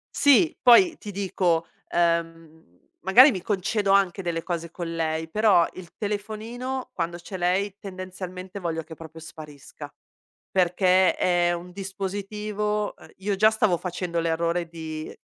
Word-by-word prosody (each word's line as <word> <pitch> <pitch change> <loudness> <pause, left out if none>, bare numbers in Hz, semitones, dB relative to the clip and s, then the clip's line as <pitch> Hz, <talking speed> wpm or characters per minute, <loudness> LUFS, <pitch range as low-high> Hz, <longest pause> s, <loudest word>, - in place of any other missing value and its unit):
Sì. 315 +4 +4
Poi, 320 +7 +6
ti 205 - -8
dico, 180 -4 0 0.2
ehm, 165 - -2 0.2
magari 245 - +7
mi 185 - -4
concedo 200 +1 0
anche 195 -1 +3
delle 170 -2 -3
cose 170 -2 -4
con 170 -2 -5
lei, 160 0 -2
però 210 -4 +4
il 175 -2 -11
telefonino 220 +5 -4
quando 170 0 -3
c'è 185 +2 -8
lei, 185 +3 0
tendenzialmente, 185 0 -8
voglio 165 -2 -3
che 160 +1 -11
proprio 160 0 -11
sparisca, 155 -3 -11 0.6
perché 185 0 +3
è 175 -1 +2
un 175 +1 -6
dispositivo 205 +2 -3
ehm, - - -16
io 195 +1 -2
già 215 +2 +5
stavo 215 -5 +2
facendo 175 -1 -3
l'errore 170 +1 0
di 160 -1 -7
185 Hz, 135 wpm, -25 LUFS, 170-205 Hz, 0.6 s, magari